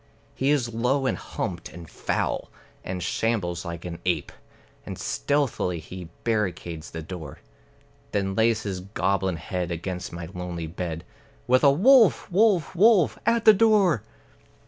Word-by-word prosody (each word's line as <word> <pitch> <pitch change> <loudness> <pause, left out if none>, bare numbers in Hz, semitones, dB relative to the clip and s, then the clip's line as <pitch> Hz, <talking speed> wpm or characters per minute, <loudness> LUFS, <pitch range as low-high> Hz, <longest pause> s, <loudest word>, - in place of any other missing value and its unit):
He 135 - 0
is 125 -6 +1
low 125 +4 +1
and - - +1
humped - - -5
and 85 -1 -10
foul, - - -2 0.3
and 90 -1 -4
shambles 95 -7 -1
like 85 0 -6
an 85 -1 -6
ape; 85 -5 -1 0.5
And - - -7
stealthily 140 -11 -1
he 90 +1 -9
barricades 90 -8 -2
the 80 -1 -7
door, 80 -4 -8 0.7
Then 95 -1 -1
lays 110 +1 +2
his 95 -3 -3
goblin 95 -1 -1
head 90 +2 -4
against 90 +1 -4
my 85 0 -6
lonely 90 -2 -5
bed, 85 0 -5 0.4
With 130 +2 +3
a 140 - +8
"Wolf, 225 - +5
wolf, 190 -4 +3
wolf," 180 - +4
at 230 -1 +2
the 215 - +10
door! 205 - +4
95 Hz, 145 wpm, -25 LUFS, 85-140 Hz, 0.7 s, the